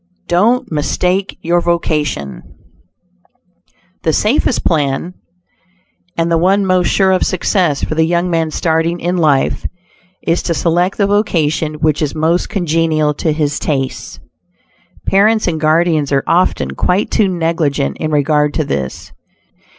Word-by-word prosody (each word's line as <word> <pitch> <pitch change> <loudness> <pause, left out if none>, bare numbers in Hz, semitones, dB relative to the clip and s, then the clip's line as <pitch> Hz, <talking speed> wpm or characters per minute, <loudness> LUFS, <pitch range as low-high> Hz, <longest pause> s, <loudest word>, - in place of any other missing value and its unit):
DON'T 225 +7 +1
MISTAKE 180 +5 -1
YOUR 175 +1 +2
VOCATION 150 - -2 1.6
The 160 - +1
safest 220 - +1
plan, 150 +2 0 1.0
and 165 0 0
the 165 - +3
one 195 +3 +2
most 185 -1 +2
sure 190 -1 +2
of 185 - +2
success 180 -5 0
for - - -1
the 160 +1 +2
young 170 +2 0
man 165 -2 0
starting 165 +2 0
in 175 +2 -1
life, 150 -5 +1 0.6
is 165 +1 +1
to 170 - -2
select 175 +4 0
the 200 - +2
vocation 160 -7 0
which 150 0 0
is 150 -1 -2
most 160 +3 0
congenial 165 -5 0
to 155 +2 -1
his 150 -1 -1
tastes. 135 -3 -3 0.9
Parents 215 +2 +3
and 160 -3 -2
guardians 155 -2 +2
are 135 -1 +1
often 170 - +1
quite 180 - 0
too 210 - +2
negligent 165 -5 -1
in 155 - -2
regard 150 0 +1
to 155 - +1
this. 70 - -4
165 Hz, 135 wpm, -15 LUFS, 150-180 Hz, 1.6 s, the